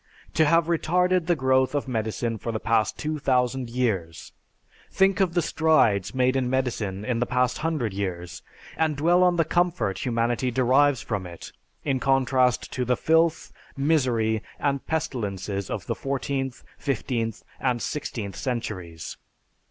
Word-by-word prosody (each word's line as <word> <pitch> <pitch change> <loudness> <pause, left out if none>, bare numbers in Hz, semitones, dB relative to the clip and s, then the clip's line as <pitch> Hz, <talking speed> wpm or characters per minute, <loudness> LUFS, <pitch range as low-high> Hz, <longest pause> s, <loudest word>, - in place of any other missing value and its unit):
To 160 - +4
have 165 +2 +4
retarded 180 +1 +1
the 175 - +3
growth 130 -1 +2
of 145 - -1
medicine 115 -1 -2
for 115 - -3
the 110 - -2
past 110 -1 +1
2000 130 -4 0
years! 100 -10 -2 0.6
Think 195 +1 +3
of 185 -3 +1
the 175 - +3
strides 130 - +2
made 130 0 +2
in 130 -2 0
medicine 115 -6 -2
in 120 -2 0
the 120 - 0
past 125 0 +1
hundred 150 -10 -1
years, 90 -3 -4 0.4
and 160 -2 +1
dwell 170 +5 +4
on 180 -1 +4
the 165 -2 +2
comfort 175 - 0
humanity 120 +1 0
derives 130 +2 +3
from 100 -4 -3
it, 85 -1 -10 0.3
in 135 -3 0
contrast 130 -2 +2
to 125 - -1
the 125 0 +1
filth, 160 0 +2 0.2
misery, 125 -7 +1 0.2
and 140 -1 -1
pestilences 100 - -3
of - - -4
the - - -1
fourteenth, 135 -1 -3 0.2
fifteenth, 115 -5 -2 0.2
and 125 -2 0
sixteenth 115 -8 -4
centuries. 95 - -4
130 Hz, 145 wpm, -25 LUFS, 115-150 Hz, 0.6 s, To